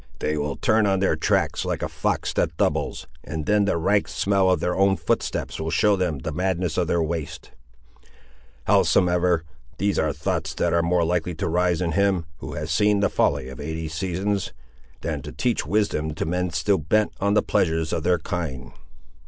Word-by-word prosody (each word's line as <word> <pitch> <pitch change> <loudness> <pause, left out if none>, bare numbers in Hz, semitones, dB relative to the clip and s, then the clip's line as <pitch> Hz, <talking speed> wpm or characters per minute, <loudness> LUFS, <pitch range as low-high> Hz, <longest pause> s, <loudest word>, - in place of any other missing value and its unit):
They 75 - -1
will 75 -1 -2
turn 110 -1 +2
on 95 -1 +2
their 95 - +2
tracks - - +1
like - - -2
a - - 0
fox - - -2
that 80 -1 0
doubles, - - 0 0.2
and 80 -1 -5
then 105 -1 +3
the 100 - +1
rank 100 +5 +2
smell 100 -1 +1
of 90 -3 +3
their 90 +2 -1
own 95 0 +3
footsteps - - -2
will 80 0 -2
show 100 +5 +3
them 90 -6 -1
the 70 +4 -5
madness 90 0 -1
of 90 -2 +1
their 85 -2 +1
waste. 80 -2 -5 1.1
Howsomever, 90 -2 +3 0.3
these 100 0 +1
are 80 -1 +1
thoughts - - -2
that - - 0
are 85 - +3
more 85 +1 +2
likely 85 0 -1
to - - -2
rise 90 +1 +1
in 85 -2 0
him 95 -1 +1
who 65 +2 -7
has 75 +1 -4
seen 105 +5 +3
the 100 - +3
folly 70 -2 +1
of 65 -1 -9
eighty 80 +2 -4
seasons, 95 +4 -2 0.5
than - - -3
to - - -8
teach 120 -11 -1
wisdom 80 -6 0
to - - -2
men 90 +2 -1
still 85 +4 +1
bent 105 +8 +1
on 100 +1 +1
the - - +4
pleasures 80 -1 0
of - - 0
their 90 +2 +2
kind! 80 -7 -4
85 Hz, 195 wpm, -24 LUFS, 80-95 Hz, 1.1 s, the